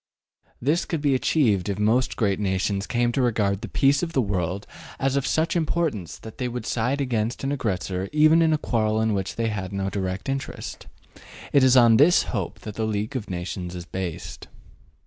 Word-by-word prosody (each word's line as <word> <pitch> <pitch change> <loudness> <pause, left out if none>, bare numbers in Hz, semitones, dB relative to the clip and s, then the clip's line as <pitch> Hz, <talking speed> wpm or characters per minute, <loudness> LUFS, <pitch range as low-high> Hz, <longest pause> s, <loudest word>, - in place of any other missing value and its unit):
This 150 +8 +1
could 165 - -2
be 145 -2 +2
achieved 115 - +2
if 100 - -2
most 110 +5 +1
great 100 -4 0
nations 100 0 -1
came 120 -1 +1
to 135 - 0
regard 105 -5 +1
the - - -5
peace 140 0 +2
of 170 -1 -3
the 135 - +3
world 95 -1 -2 0.3
as 135 0 0
of 140 -3 0
such 160 +7 +1
importance 160 - -1
that 110 - -12
they 125 - -1
would 120 -2 -5
side 125 +5 0
against 120 -3 -1
an 135 - -1
aggressor 95 -7 -2
even 155 +2 +5
in 160 -1 +4
a 155 - +3
quarrel 110 -6 0
in 110 -1 +1
which 95 -1 -2
they 115 -1 0
had 95 -3 -4
no 95 -1 -2
direct 95 -1 -3
interest. 135 0 -5 0.7
It 140 - +5
is 130 0 +6
on 115 -2 +7
this 160 +7 +5
hope 95 -8 -4
that 105 - -7
the 110 +1 -2
League 105 +4 -2
of 115 -5 -4
Nations 90 0 -5
is 90 -1 -7
based. 90 -2 -6
110 Hz, 200 wpm, -24 LUFS, 100-135 Hz, 0.7 s, on